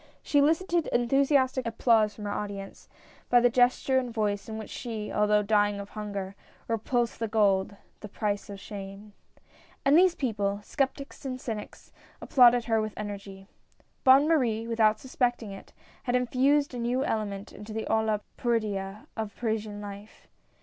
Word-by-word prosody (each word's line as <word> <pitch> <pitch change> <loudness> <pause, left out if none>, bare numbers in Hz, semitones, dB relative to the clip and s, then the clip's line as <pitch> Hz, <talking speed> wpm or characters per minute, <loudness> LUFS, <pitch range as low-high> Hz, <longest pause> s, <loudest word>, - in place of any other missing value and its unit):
She 290 - +2
elicited 330 +3 +2
enthusiastic 260 +1 +2
applause 225 -2 +2
from 210 - -8
her 205 - -2
audience, 200 -1 -6 0.4
by 245 - +6
the 240 0 +3
gesture 255 +2 +3
and 250 -2 -4
voice 210 -2 -2
in 220 - -5
which 220 - -8
she 220 -3 -5
— - - -7
although 210 0 +3
dying 205 -1 +2
of 200 0 -7
hunger 200 -3 -5 0.2
— - - -30
repulsed 235 +1 -1
the 225 - -1
gold 200 -2 +2
— - - -34
" - - -39
the 210 - -8
price 205 0 -2
of 200 -1 -7
shame." 200 0 -9 0.7
And 275 +2 +5
these 360 +1 +5
people 205 -6 -1
— - - -24
skeptics 275 +3 -3
and 255 -2 -4
cynics 220 -4 -7 0.2
— - - -29
applauded 245 -3 +5
her 225 -2 +2
with 215 -1 -5
energy. 200 -2 -7 0.6
Bonne 270 +2 +7
Marie, 240 -9 +1
without 220 -2 +3
suspecting 245 -4 -1
it, 195 - -11 0.3
had 245 -1 +1
infused 265 +3 +2
a 245 - -5
new 245 +3 0
element 205 -2 -3
into 210 +1 -10
the 220 0 -3
olla 220 -1 +1 0.2
podrida 210 -4 -2
of 220 -3 -5
Parisian 220 -3 -3
life. 205 +1 -10
220 Hz, 170 wpm, -28 LUFS, 205-250 Hz, 0.7 s, Bonne